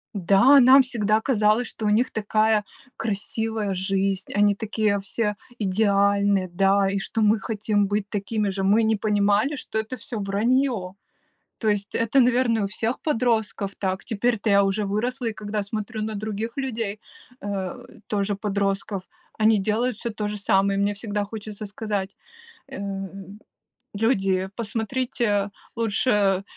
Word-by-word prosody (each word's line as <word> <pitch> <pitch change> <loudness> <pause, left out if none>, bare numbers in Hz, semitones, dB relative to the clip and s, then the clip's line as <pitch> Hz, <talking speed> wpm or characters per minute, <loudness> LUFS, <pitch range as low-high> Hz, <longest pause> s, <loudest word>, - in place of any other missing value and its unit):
Да, 200 +9 +6
нам 265 +2 +8
всегда 220 -3 +1
казалось, 220 -1 +2
что 220 - -6
у - - +3
них 225 +5 +2
такая 215 0 +1 0.3
красивая 220 0 -2
жизнь, 190 +1 -1
они 205 0 +4
такие 215 -1 0
все 210 +2 -2 0.2
идеальные, 200 -1 +2
да, 195 +2 +3
и 195 0 -1
что 220 +3 -2
мы 215 +1 +4
хотим 210 -1 0
быть 205 0 -1
такими 210 0 -1
же. 195 0 -3
Мы 205 +4 +4
не 220 0 +2
понимали, 210 +5 +1
что 220 -5 -4
это 220 +4 -5
всё 225 -1 -5
враньё. 210 0 0 0.7
То 220 - -1
есть 205 -1 -1
это, 230 +4 +3
наверное, 240 -3 +3
у - - 0
всех 225 +4 -2
подростков 225 -7 0
так. 190 -1 -2
Теперь-то 230 -1 0
я 200 0 +5
уже 195 +2 0
выросла. 235 +5 -2
И - - -6
когда 210 -1 -3
смотрю 215 +2 -4
на 215 0 -3
других 215 +2 -4
людей, 225 -6 -3 0.4
э, 195 -3 -4 0.3
тоже 205 -1 -1
подростков, 200 -1 -2 0.4
они 220 0 +4
делают 220 +4 0
всё 235 - -4
то 210 -1 -3
же 210 - -4
самое. 195 0 +2
И - - +2
мне 205 +1 +1
всегда 205 0 -3
хочется 215 0 -7
сказать, 205 -1 -4 0.6
эм: 195 -3 -7 0.5
"Люди, 195 -4 +1
посмотрите 225 -2 -1 0.3
лучше 230 +2 +1
эм 195 -2 +2
210 Hz, 150 wpm, -24 LUFS, 200-225 Hz, 0.7 s, нам